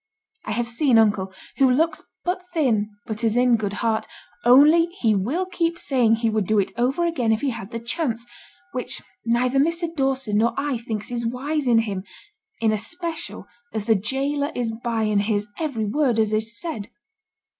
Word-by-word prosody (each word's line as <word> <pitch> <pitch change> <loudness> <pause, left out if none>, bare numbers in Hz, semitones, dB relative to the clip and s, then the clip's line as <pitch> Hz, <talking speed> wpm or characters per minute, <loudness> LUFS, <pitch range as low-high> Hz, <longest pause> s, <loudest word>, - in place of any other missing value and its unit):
I - - -2
have 235 +2 -1
seen 240 +1 +3
uncle, 205 -4 +3 0.3
who 265 -1 +5
looks 320 +6 +2 0.2
but 360 +1 -1
thin, 225 -9 +2 0.2
but 220 -1 -5
is 225 0 +2
in 245 -1 +5
good 205 -3 -2
heart: 220 -1 0 0.4
only 295 +7 +7
he 225 -3 +3
will 250 - 0
keep 340 -2 -1
saying 245 -5 +2
he 225 0 0
would 215 -4 0
do 215 - +2
it 200 - +1
over 260 +8 +1
again 255 -10 +1
if 220 - +1
he 280 -2 0
had 195 -4 -7
the 230 -1 -5
chance, 235 0 -2 0.5
which 250 - -2 0.2
neither 250 +3 +2
Mr. 335 +3 0
Dawson 270 -7 +1
nor 235 +2 +2
I 275 -4 -1
think 220 -2 -5
is 240 -1 -2
wise 270 +5 -2
in 235 -2 +5
him, 205 -4 -1 0.6
in 220 -1 +3
especial 335 - -4 0.3
as 215 -2 -2
the 225 - +5
gaoler 275 - -1
is 240 -2 0
by 230 -2 0
and 210 -1 +2
hears 205 -1 0
every 275 -9 -1
word 250 +2 +1
as 215 -1 +2
is 220 +2 0
said. 235 - -4
235 Hz, 185 wpm, -23 LUFS, 220-285 Hz, 0.6 s, only